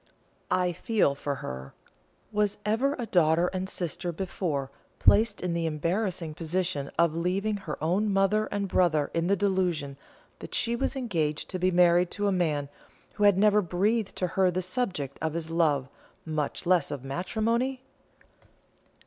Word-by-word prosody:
I 180 Hz, -1 st, +2 dB
feel 195 Hz, -3 st, +1 dB
for 140 Hz, 0 st, -3 dB
her. 65 Hz, +1 st, -7 dB, 0.6 s
Was 210 Hz, -1 st, 0 dB
ever 250 Hz, +7 st, +1 dB
a 245 Hz, -, -3 dB
daughter 170 Hz, -3 st, +3 dB
and 185 Hz, 0 st, -3 dB
sister 175 Hz, 0 st, -3 dB
before 160 Hz, -6 st, -3 dB, 0.3 s
placed 215 Hz, 0 st, +4 dB
in 180 Hz, -2 st, -1 dB
the 170 Hz, -1 st, 0 dB
embarrassing 165 Hz, +1 st, -2 dB
position 165 Hz, -3 st, -2 dB
of 170 Hz, -2 st, +3 dB
leaving 195 Hz, +5 st, 0 dB
her 180 Hz, -7 st, -6 dB
own 195 Hz, +6 st, +1 dB
mother 195 Hz, +2 st, +2 dB
and 200 Hz, -1 st, -2 dB
brother 160 Hz, -6 st, +2 dB
in 165 Hz, 0 st, 0 dB
the 200 Hz, -, +3 dB
delusion 180 Hz, -8 st, 0 dB, 0.4 s
that -, -, -7 dB
she 235 Hz, 0 st, 0 dB
was 270 Hz, +3 st, -1 dB
engaged 165 Hz, -, -2 dB
to 185 Hz, -, -3 dB
be 185 Hz, +1 st, +3 dB
married 175 Hz, 0 st, +4 dB
to 205 Hz, -, 0 dB
a 200 Hz, -, +3 dB
man 155 Hz, -6 st, 0 dB, 0.5 s
who 210 Hz, -, +1 dB
had 200 Hz, -2 st, +6 dB
never 210 Hz, +1 st, +5 dB
breathed 200 Hz, +4 st, 0 dB
to 185 Hz, -, -1 dB
her 185 Hz, +1 st, +2 dB
the 180 Hz, +1 st, -1 dB
subject 180 Hz, -, -2 dB
of 160 Hz, 0 st, -2 dB
his 165 Hz, -1 st, -3 dB
love, 150 Hz, -6 st, +2 dB, 0.4 s
much 155 Hz, -1 st, -2 dB
less 175 Hz, -4 st, +3 dB
of 145 Hz, -3 st, -5 dB
matrimony? 230 Hz, -, -1 dB
180 Hz, 160 wpm, -28 LUFS, 160-205 Hz, 0.6 s, had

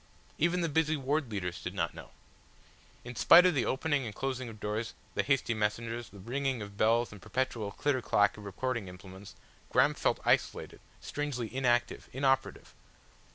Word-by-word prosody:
Even 170 Hz, +3 st, +2 dB
the 170 Hz, -, +1 dB
busy 155 Hz, 0 st, +1 dB
ward 140 Hz, 0 st, -1 dB
leaders 90 Hz, -5 st, -4 dB
did -, -, -5 dB
not -, -, -1 dB
know. -, -, -11 dB, 0.9 s
In 120 Hz, 0 st, -8 dB
spite 180 Hz, -, +8 dB
of 180 Hz, -, +4 dB
the 135 Hz, -5 st, +1 dB
opening 145 Hz, +1 st, 0 dB
and 110 Hz, -4 st, -6 dB
closing 130 Hz, -1 st, -3 dB
of 110 Hz, -1 st, -11 dB
doors, 105 Hz, +2 st, -3 dB, 0.2 s
the -, -, +1 dB
hasty 135 Hz, -4 st, +1 dB
messengers, 115 Hz, +2 st, -2 dB
the 100 Hz, -, -14 dB
ringing 130 Hz, +5 st, -2 dB
of 100 Hz, 0 st, -10 dB
bells 115 Hz, +3 st, +2 dB
and 105 Hz, -3 st, -11 dB
the -, -, -17 dB
perpetual 120 Hz, -5 st, -2 dB
clitter 140 Hz, +3 st, 0 dB
clack 105 Hz, -3 st, +3 dB
of 105 Hz, -, -11 dB
recording 110 Hz, +2 st, -3 dB
implements, 95 Hz, +1 st, -11 dB, 0.3 s
Graham -, -, +4 dB
felt -, -, 0 dB
isolated, -, -, +1 dB, 0.2 s
strangely 135 Hz, -6 st, -4 dB
inactive, 120 Hz, -3 st, +1 dB
inoperative. 135 Hz, 0 st, 0 dB
120 Hz, 170 wpm, -31 LUFS, 105-135 Hz, 0.9 s, spite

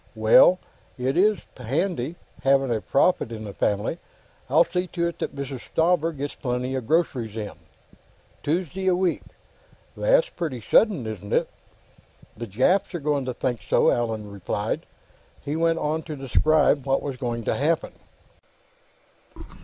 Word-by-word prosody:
"Well! -, -, +6 dB, 0.4 s
It 130 Hz, +2 st, -1 dB
is 205 Hz, +4 st, +3 dB
handy, 140 Hz, -, -2 dB, 0.3 s
having 135 Hz, -2 st, +3 dB
a 110 Hz, -, -2 dB
prophet 140 Hz, -2 st, +2 dB
in 110 Hz, -1 st, -6 dB
the 100 Hz, -2 st, -7 dB
family! 105 Hz, -, -1 dB, 0.5 s
I'll -, -, +6 dB
see 180 Hz, 0 st, -2 dB
to 170 Hz, -1 st, -2 dB
it 170 Hz, -, -10 dB
Mrs. 140 Hz, -2 st, -4 dB
Stauber 165 Hz, 0 st, +2 dB
gets 145 Hz, -2 st, -5 dB
plenty 125 Hz, 0 st, -3 dB
of 130 Hz, -4 st, -3 dB
groceries 130 Hz, -10 st, 0 dB
in.... 105 Hz, -2 st, -4 dB, 0.9 s
Tuesday 180 Hz, +4 st, -2 dB
a 185 Hz, -, +4 dB
week? 180 Hz, -1 st, 0 dB, 0.7 s
That's -, -, +3 dB
pretty 155 Hz, -, -4 dB
sudden, 160 Hz, -, +3 dB
isn't 105 Hz, -2 st, -6 dB
it?" -, -, +2 dB, 0.9 s
"The 115 Hz, +2 st, -6 dB
Japs 130 Hz, -, +1 dB
are -, -, -2 dB
going 145 Hz, -2 st, 0 dB
to 125 Hz, -, -3 dB
think 120 Hz, -2 st, -2 dB
so," -, -, +3 dB
Allan 110 Hz, -3 st, -2 dB
replied. 100 Hz, -2 st, -3 dB, 0.6 s
He 145 Hz, -, -2 dB
went 165 Hz, 0 st, +2 dB
on 155 Hz, +1 st, -1 dB
to 155 Hz, -, -5 dB
describe 140 Hz, +1 st, +2 dB
what 135 Hz, -, +1 dB
was 140 Hz, -2 st, -3 dB
going 120 Hz, -2 st, -3 dB
to -, -, 0 dB
happen. 155 Hz, +4 st, 0 dB
140 Hz, 145 wpm, -24 LUFS, 120-170 Hz, 0.9 s, Well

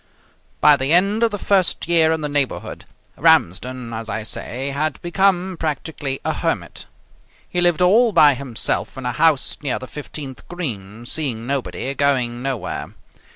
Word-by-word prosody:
By 150 Hz, -1 st, +7 dB
the 135 Hz, +4 st, +1 dB
end 200 Hz, +5 st, +3 dB
of 230 Hz, -, +4 dB
the 205 Hz, -, -4 dB
first 195 Hz, -4 st, +1 dB
year 165 Hz, -2 st, +4 dB
in 160 Hz, -1 st, -1 dB
the 150 Hz, -, -1 dB
neighbourhood, 145 Hz, -2 st, -2 dB, 0.3 s
Ramsden, 120 Hz, +7 st, +2 dB
as 115 Hz, 0 st, -5 dB
I 110 Hz, -1 st, -3 dB
say, 120 Hz, +4 st, -4 dB
had 145 Hz, +2 st, -2 dB
become 185 Hz, 0 st, +1 dB
practically 150 Hz, -3 st, -3 dB
a -, -, +1 dB
hermit. -, -, -3 dB, 0.6 s
He 180 Hz, -, -1 dB
lived 175 Hz, -1 st, +3 dB
all 225 Hz, +6 st, +5 dB
by 155 Hz, -6 st, +6 dB
himself 130 Hz, 0 st, -2 dB
in 130 Hz, -, -6 dB
a 125 Hz, -, 0 dB
house 150 Hz, +2 st, +1 dB
near 140 Hz, -4 st, -1 dB
the 130 Hz, -, -7 dB
fifteenth 140 Hz, -1 st, -8 dB
green, 115 Hz, -, -6 dB
seeing 120 Hz, -5 st, -2 dB
nobody, 135 Hz, 0 st, -3 dB
going 130 Hz, -4 st, +1 dB
nowhere. 130 Hz, -3 st, -4 dB
140 Hz, 155 wpm, -21 LUFS, 125-170 Hz, 0.6 s, By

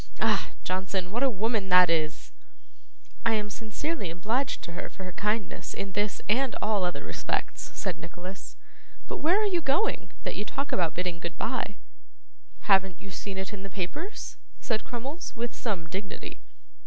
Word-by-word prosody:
Ah! -, -, +3 dB
Johnson, 185 Hz, 0 st, 0 dB
what 235 Hz, +4 st, 0 dB
a 275 Hz, -, +6 dB
woman 215 Hz, -2 st, +1 dB
that 180 Hz, 0 st, +9 dB
is!' 160 Hz, -1 st, +1 dB, 0.9 s
'I 230 Hz, -, +4 dB
am 210 Hz, -1 st, 0 dB
sincerely 225 Hz, -, -2 dB
obliged 220 Hz, +11 st, 0 dB
to 170 Hz, -, -5 dB
her 170 Hz, -, -4 dB
for 190 Hz, -, -8 dB
her 185 Hz, -, -4 dB
kindness 210 Hz, +1 st, -1 dB
in 195 Hz, 0 st, -3 dB
this 205 Hz, +1 st, 0 dB
and 255 Hz, +4 st, +3 dB
all 210 Hz, -3 st, +2 dB
other 180 Hz, 0 st, 0 dB
respects,' -, -, -2 dB
said 185 Hz, -4 st, -1 dB
Nicholas. 180 Hz, +3 st, -7 dB, 0.5 s
'But -, -, -2 dB
where 345 Hz, +7 st, +5 dB
are 430 Hz, -, +4 dB
you 365 Hz, -4 st, +3 dB
going, 325 Hz, +10 st, +2 dB
that -, -, -1 dB
you -, -, -1 dB
talk 275 Hz, +6 st, -2 dB
about 170 Hz, -4 st, +2 dB
bidding 180 Hz, -1 st, -1 dB
goodbye?' 185 Hz, +5 st, -1 dB, 0.9 s
'Haven't 190 Hz, -2 st, +5 dB
you 195 Hz, -, -9 dB
seen 195 Hz, +1 st, -4 dB
it 190 Hz, +2 st, -3 dB
in 200 Hz, -, -5 dB
the 195 Hz, -, -6 dB
papers?' 255 Hz, -, -4 dB, 0.2 s
said 220 Hz, -3 st, 0 dB
Crummles, 270 Hz, +8 st, -4 dB
with 235 Hz, 0 st, -2 dB
some 195 Hz, -8 st, -1 dB
dignity. 190 Hz, +4 st, -5 dB
200 Hz, 165 wpm, -29 LUFS, 185-240 Hz, 0.9 s, that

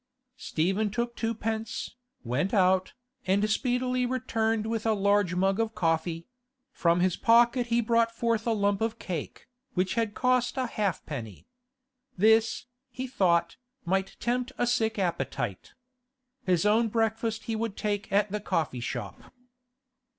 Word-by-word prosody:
Stephen 195 Hz, +3 st, 0 dB
took 235 Hz, +3 st, -2 dB
twopence, 225 Hz, -1 st, -3 dB, 0.3 s
went 140 Hz, -, -1 dB
out, 185 Hz, -1 st, +3 dB, 0.3 s
and 200 Hz, +3 st, +3 dB
speedily 250 Hz, +2 st, 0 dB
returned 225 Hz, -3 st, 0 dB
with 225 Hz, 0 st, -2 dB
a 225 Hz, -, +2 dB
large 200 Hz, -2 st, +2 dB
mug 195 Hz, +3 st, +1 dB
of 225 Hz, -1 st, -1 dB
coffee; 165 Hz, -1 st, 0 dB, 0.5 s
from 170 Hz, -6 st, +2 dB
his 185 Hz, -1 st, +2 dB
pocket 240 Hz, +1 st, +4 dB
he 235 Hz, 0 st, +2 dB
brought 230 Hz, 0 st, +2 dB
forth 230 Hz, 0 st, -1 dB
a -, -, +3 dB
lump 205 Hz, -2 st, +1 dB
of 225 Hz, 0 st, -1 dB
cake, 175 Hz, -9 st, -6 dB, 0.3 s
which 185 Hz, 0 st, +1 dB
had 225 Hz, -3 st, -1 dB
cost 250 Hz, 0 st, +1 dB
a 260 Hz, -, +1 dB
halfpenny. 150 Hz, -, -4 dB, 0.7 s
This, 220 Hz, +4 st, +3 dB, 0.2 s
he 255 Hz, +1 st, -5 dB
thought, 170 Hz, -9 st, +1 dB, 0.3 s
might 190 Hz, +2 st, -1 dB
tempt 250 Hz, +2 st, -1 dB
a -, -, +1 dB
sick 225 Hz, -2 st, +1 dB
appetite. 135 Hz, -, -3 dB, 0.7 s
His 180 Hz, +1 st, +2 dB
own 220 Hz, +3 st, +4 dB
breakfast 225 Hz, 0 st, -1 dB
he 225 Hz, -, -3 dB
would 220 Hz, -2 st, -3 dB
take 205 Hz, -1 st, -2 dB
at 205 Hz, 0 st, +2 dB
the 210 Hz, -, -1 dB
coffee 155 Hz, -9 st, -1 dB
shop. 120 Hz, -3 st, -5 dB
215 Hz, 140 wpm, -28 LUFS, 185-230 Hz, 0.7 s, pocket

